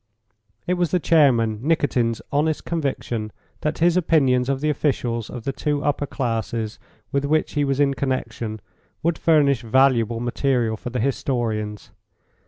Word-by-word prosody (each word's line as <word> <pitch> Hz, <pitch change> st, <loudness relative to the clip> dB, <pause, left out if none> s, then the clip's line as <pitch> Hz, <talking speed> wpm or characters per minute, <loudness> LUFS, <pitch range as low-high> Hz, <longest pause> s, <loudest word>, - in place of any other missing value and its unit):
It 180 Hz, -, +1 dB
was 175 Hz, -2 st, 0 dB
the 180 Hz, -, +1 dB
chairman, 125 Hz, -10 st, +3 dB
Nikitin's, 130 Hz, -6 st, +1 dB
honest 150 Hz, +2 st, 0 dB
conviction 130 Hz, -9 st, -2 dB, 0.3 s
that 150 Hz, 0 st, -2 dB
his 170 Hz, +1 st, +3 dB
opinions 135 Hz, -8 st, +3 dB
of 135 Hz, -1 st, 0 dB
the 150 Hz, +2 st, 0 dB
officials 120 Hz, -6 st, -1 dB
of 120 Hz, -3 st, -7 dB
the 135 Hz, -, -1 dB
two 145 Hz, 0 st, -1 dB
upper 145 Hz, 0 st, 0 dB
classes 115 Hz, -4 st, -3 dB, 0.3 s
with 140 Hz, 0 st, 0 dB
which 155 Hz, +2 st, +1 dB
he 145 Hz, -, +1 dB
was 135 Hz, -1 st, 0 dB
in 140 Hz, -1 st, +3 dB
connection 120 Hz, -5 st, -3 dB, 0.4 s
would 165 Hz, 0 st, 0 dB
furnish 145 Hz, -6 st, +3 dB
valuable 120 Hz, -1 st, +3 dB
material 120 Hz, -1 st, 0 dB
for 115 Hz, -, -6 dB
the 125 Hz, -, -3 dB
historians. 115 Hz, -5 st, -2 dB
135 Hz, 150 wpm, -22 LUFS, 115-150 Hz, 0.4 s, chairman